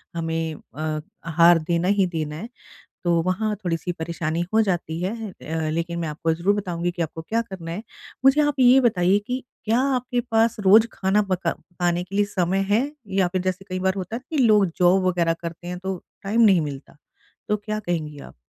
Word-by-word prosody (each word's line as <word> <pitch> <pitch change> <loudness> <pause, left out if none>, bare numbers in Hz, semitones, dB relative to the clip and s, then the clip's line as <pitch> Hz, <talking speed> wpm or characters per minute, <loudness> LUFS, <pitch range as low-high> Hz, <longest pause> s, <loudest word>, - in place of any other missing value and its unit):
हमें 165 -1 -2
अ, 155 0 -11 0.4
आहार 170 +1 +5
देना 170 +1 +1
ही 200 -1 +3
देना 155 -3 -4
है 215 +9 -7 0.5
तो 175 - +2
वहाँ 210 +4 0
थोड़ी-सी 175 0 -2
परेशानी 165 -1 -3
हो 225 - +5
जाती 175 -5 -1
है। 185 +2 -1 0.2
अ, 160 -2 -4
लेकिन 170 +1 -2
मैं 165 - -2
आपको 155 +2 -1
ज़रूर 180 +5 +1
बताऊँगी 175 -4 -2
कि 175 - -5
आपको 160 0 -3
क्या 225 +8 -1
करना 190 -7 -8
है। 195 +6 -5 0.4
मुझे 270 +3 +6
आप 290 -2 0
ये 255 +1 +7
बताइए 195 -5 +3
कि 255 0 -3 0.2
क्या 225 +3 +2 0.2
आपके 250 0 -1
पास 225 0 +3
रोज़ 210 +3 +6
खाना 195 +2 +2
पका 185 0 0
पकाने 175 0 -2
के 190 +2 -9
लिए 205 - +3
समय 190 -1 0
है? 240 +8 +2 0.2
या 190 -2 +1
फिर 185 +1 -2
जैसे 185 +1 -3
कई 185 0 -2
बार 190 0 +1
होता 195 +4 -4
है 245 - -5
कि 315 - -2
लोग 210 -3 +5
जॉब 180 +1 +4
वगैरह 170 -2 +2
करते 170 0 -7
हैं 180 0 -5
तो 190 0 -3 0.3
टाइम 210 +4 +1
नहीं 195 -6 +6
मिलता। 140 -2 -7 0.5
तो 210 - +2
क्या 215 +1 -4
कहेंगी 160 -7 -3
आप? - - -12
185 Hz, 200 wpm, -23 LUFS, 170-210 Hz, 0.5 s, ये